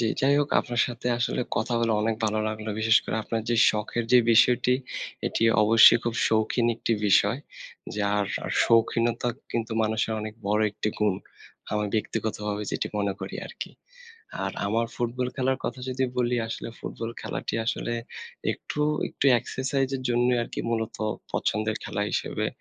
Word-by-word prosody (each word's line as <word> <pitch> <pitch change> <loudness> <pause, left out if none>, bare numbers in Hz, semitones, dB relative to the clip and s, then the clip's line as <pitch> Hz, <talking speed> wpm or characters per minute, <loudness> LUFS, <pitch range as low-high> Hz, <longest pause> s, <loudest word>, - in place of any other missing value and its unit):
জি, - - +1 0.2
যাই 140 +2 +4
হোক 145 0 +1
আপনার 120 -2 -2
সাথে 120 0 -6
আসলে 120 - 0 0.2
কথা 110 +3 -1
বলে 115 -1 +2
অনেক 110 0 +1
ভালো 110 0 +1
লাগলো। 110 0 -5
বিশেষ 110 +2 +5
করে - - -2
আপনার 115 +1 -2
যে 120 - +2
শখের 110 +2 -2
যে 125 - +9
বিষয়টি 125 +2 +5 0.5
এটি - - -1 0.2
অবশ্যই 110 +2 +8
খুব 120 -1 -1
শৌখিন 115 +2 +2
একটি 115 - -1
বিষয়। 100 +5 +4 0.6
যার 100 0 +1 0.4
শৌখিনতা 115 +1 +2 0.2
কিন্তু 115 -1 -2
মানুষের 110 +1 0
অনেক 110 0 -6
বড় 105 +1 +2
একটি 105 +1 -3
গুণ। 105 -2 +2 0.6
আমি 105 0 +1
ব্যক্তিগতভাবে 105 -1 -2
যেটি - - -1
মনে 100 -1 0
করি - - -6
আরকি। - - -7 0.7
আর - - -2
আমার 115 +3 +1
ফুটবল 125 +1 -2
খেলার 130 0 +1
কথা 130 - -3
যদি 130 +1 0
বলি, 125 0 +1
আসলে 115 - -5
ফুটবল 115 0 -5
খেলাটি - - -4
আসলে 120 - -1 0.6
একটু, 150 - -6 0.3
একটু - - -5
এক্সারসাইজের 130 +2 -2
জন্যই 120 +1 +3
আরকি - - -5
মূলত 110 -1 -2 0.4
পছন্দের 110 +1 0
খেলা 105 - -2
হিসেবে - - -1
115 Hz, 155 wpm, -26 LUFS, 110-120 Hz, 0.7 s, যে